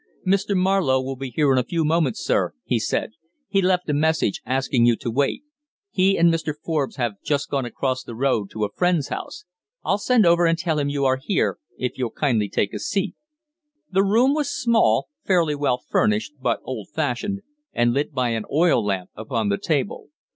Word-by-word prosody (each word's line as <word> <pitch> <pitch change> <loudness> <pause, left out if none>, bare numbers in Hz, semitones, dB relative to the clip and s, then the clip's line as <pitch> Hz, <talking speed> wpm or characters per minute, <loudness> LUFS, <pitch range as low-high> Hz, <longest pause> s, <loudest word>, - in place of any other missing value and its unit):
"Mr. 195 +1 +1
Marlowe 185 -8 +2
will 135 +1 -4
be 135 0 -6
here 140 +3 +2
in 130 - +4
a - - +1
few 165 +4 -1
moments, 155 -5 +1
sir," - - 0
he - - +1
said; - - -1 0.4
"he 195 - +2
left 180 -1 +1
a 150 - 0
message 155 -7 +1
asking 130 -2 +1
you 120 -1 +5
to 115 - -4
wait. 140 - 0 0.5
He 190 +1 +3
and 170 0 +5
Mr. 160 -2 -2
Forbes 150 -4 -2
have 120 -6 -3
just 145 -1 -1
gone 135 -3 0
across 130 +2 -2
the 115 - -8
road 115 -5 0
to 110 -1 -2
a 100 - -6
friend's 180 -5 +1
house. 185 - -6 0.4
I'll 200 - +1
send 235 -1 +3
over 170 0 +5
and 165 0 +2
tell 160 -2 -1
him 145 -1 0
you 140 -1 -1
are 130 0 +3
here, 195 +7 0 0.2
if 125 +1 -3
you'll 125 -2 0
kindly 110 -5 0
take 100 - -1
a 105 - -4
seat." 195 - -1 0.8
The 195 +1 +3
room 235 +7 +3
was 300 -1 0
small, 235 -2 +2
fairly 170 -5 +2
well 145 -4 0
furnished, 110 +1 0
but - - 0
old 115 -6 -6
fashioned, 160 +8 -2 0.3
and 120 0 +2
lit 145 +4 -1
by 130 -4 0
an 115 -2 -2
oil 155 -6 +3
lamp 95 -3 -2
upon 110 -1 -2
the 100 - 0
table. 160 - -2
145 Hz, 200 wpm, -23 LUFS, 125-175 Hz, 0.8 s, you